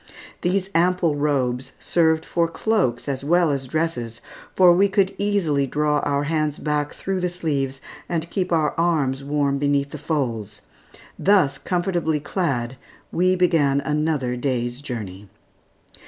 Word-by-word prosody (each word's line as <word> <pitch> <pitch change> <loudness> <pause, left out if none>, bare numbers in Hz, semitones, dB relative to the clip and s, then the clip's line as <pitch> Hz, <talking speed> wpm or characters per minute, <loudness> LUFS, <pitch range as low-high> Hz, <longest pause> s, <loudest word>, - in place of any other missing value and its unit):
These 190 +2 0
ample 175 -2 +2
robes 135 -4 -1
served 160 -2 +1
for 170 -1 +1
cloaks 165 - 0
as 135 -1 -3
well 170 +1 +3
as 135 -2 -3
dresses 125 -7 -2 0.4
for 180 -2 +7
we 195 +3 +4
could 195 -1 +2
easily 175 -9 +1
draw 150 +2 +1
our 140 0 0
hands 155 -1 -1
back 150 -1 -1
through 195 -1 -2
the 180 0 0
sleeves 140 -7 -2 0.3
and 165 -1 -1
keep 185 -2 -1
our 155 -3 +2
arms 145 -6 +1
warm 140 -1 0
beneath 140 0 +1
the 150 - -7
folds. 115 - -3 0.6
Thus 190 -8 +3
comfortably 175 -4 0
clad, 135 -6 -2 0.3
we 185 +2 +2
began 160 -6 +3
another 150 -4 -1
day's 125 -1 -2
journey. 105 -7 -7
150 Hz, 140 wpm, -22 LUFS, 135-175 Hz, 0.6 s, for